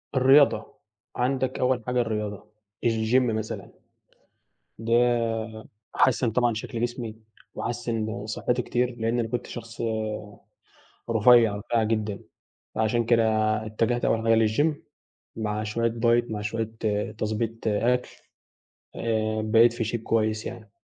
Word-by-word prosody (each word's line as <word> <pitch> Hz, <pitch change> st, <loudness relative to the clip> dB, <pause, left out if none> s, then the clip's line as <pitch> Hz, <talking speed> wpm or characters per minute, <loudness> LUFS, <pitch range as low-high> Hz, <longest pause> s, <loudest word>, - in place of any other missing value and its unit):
الرياضة، 130 Hz, -3 st, +5 dB, 0.4 s
عندك 130 Hz, +1 st, 0 dB
أوّل 125 Hz, -2 st, +1 dB
حاجة 125 Hz, 0 st, +2 dB
الرياضة 105 Hz, -3 st, -3 dB, 0.4 s
الgym 115 Hz, +1 st, +1 dB
مثلًا، 110 Hz, -3 st, -3 dB, 1.1 s
ده 115 Hz, +1 st, -1 dB, 1.0 s
حسّن 125 Hz, -2 st, +3 dB
طبعًا 120 Hz, 0 st, +2 dB
شكل 115 Hz, +1 st, -5 dB
جسمي، 120 Hz, -2 st, -3 dB, 0.4 s
وحسّن 115 Hz, -3 st, -3 dB
صحتي 125 Hz, +3 st, -1 dB
كتير 125 Hz, +1 st, -1 dB
لإن 115 Hz, +1 st, 0 dB
أنا 115 Hz, -, 0 dB
كنت 120 Hz, +1 st, -3 dB
شخص 115 Hz, -1 st, -8 dB, 1.3 s
رفيع، 115 Hz, -1 st, +5 dB
رفيع 115 Hz, +2 st, 0 dB
جدًا 110 Hz, -2 st, -1 dB, 0.6 s
فعشان 110 Hz, +2 st, +1 dB
كده 115 Hz, 0 st, +3 dB, 0.4 s
اتجهت 115 Hz, +3 st, 0 dB
أوّل 115 Hz, 0 st, +1 dB
حاجة 115 Hz, -1 st, +4 dB
للgym 145 Hz, +9 st, +2 dB, 0.6 s
مع 105 Hz, -1 st, -2 dB
شويّة 115 Hz, +2 st, 0 dB
diet 120 Hz, +1 st, +2 dB
مع 105 Hz, -, -3 dB
شويّة 110 Hz, +1 st, -3 dB, 0.5 s
تضبيط 110 Hz, +1 st, -3 dB
أكل 120 Hz, +4 st, +1 dB, 0.9 s
آآ 110 Hz, -1 st, -1 dB
بقيت 115 Hz, +2 st, +5 dB
في 120 Hz, -, -2 dB
shape 115 Hz, +1 st, -2 dB
كويّس 110 Hz, -1 st, 0 dB
يعني. 110 Hz, -3 st, -8 dB
115 Hz, 120 wpm, -26 LUFS, 110-120 Hz, 1.3 s, الرياضة